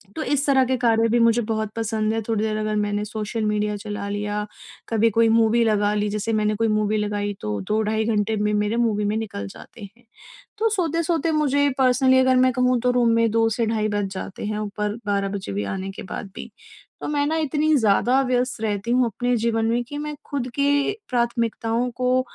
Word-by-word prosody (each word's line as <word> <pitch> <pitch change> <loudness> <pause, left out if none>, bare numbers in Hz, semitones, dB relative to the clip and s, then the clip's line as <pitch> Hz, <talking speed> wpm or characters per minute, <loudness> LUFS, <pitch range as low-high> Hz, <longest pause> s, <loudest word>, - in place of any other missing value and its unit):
तो 315 - -3
इस 290 0 0
तरह 265 -2 +4
के 260 - 0
कार्य 230 -2 +3
भी 240 - +2
मुझे 230 0 +4
बहुत 220 -1 -1
पसंद 220 -1 -1
है, 225 - -1
थोड़ी 220 -2 0
देर 215 -1 -1
अगर 215 0 -1
मैंने 205 0 -1
सोशल 215 +1 -4
मीडिया 210 0 0
चला 205 -1 -5
लिया, 205 0 -2 0.4
कभी 225 0 +3
कोई 230 - +5
मूवी 230 +1 +3
लगा 210 -2 +2
ली, 210 0 0
जैसे 210 +2 -2
मैंने 215 0 +1
कोई 225 +1 +1
मूवी 215 0 +1
लगाई 205 -1 -2
तो 105 -1 -3
2 215 +1 +1
ढाई 220 +1 0
घंटे 220 0 0
में 210 0 0
मेरे 210 +1 0
मूवी 220 -3 +1
में 210 +1 0
निकल 200 - -5
जाते 150 - -13
हैं। 245 - -25 0.5
तो 450 +2 +2
सोते-सोते 335 -4 0
मुझे 285 -2 +2
पर्सनली 260 0 +4
अगर 260 0 +4
मैं 255 0 +4
कहूँ 250 0 +2
तो 250 - +2
रूम 245 -1 +2
में 230 -1 +3
2 225 0 +3
से 230 - +1
ढाई 215 -1 0
बज 205 -1 -1
जाते 190 +1 -6
हैं, 210 0 -2
ऊपर 210 0 -3
12 200 -1 0
बजे 145 - -6
भी 100 +1 -2
आने 190 0 -5
के 195 - -9
बाद 195 +1 -7
भी। - - -8 0.5
तो - - -4
मैं 290 -1 0
ना 320 +2 0
इतनी 305 0 +1
ज़्यादा 240 +3 +3
व्यस्त 250 -2 -1
रहती 210 +1 -2
हूँ 250 0 +3
अपने 245 +2 -1
जीवन 225 0 0
में 235 +2 +1
कि 290 +5 -8
मैं 300 0 -4
खुद 270 -4 -3
की 285 +2 +2 0.2
प्राथमिकताओं 235 0 0
को 255 +1 +1
225 Hz, 215 wpm, -23 LUFS, 210-250 Hz, 0.5 s, कोई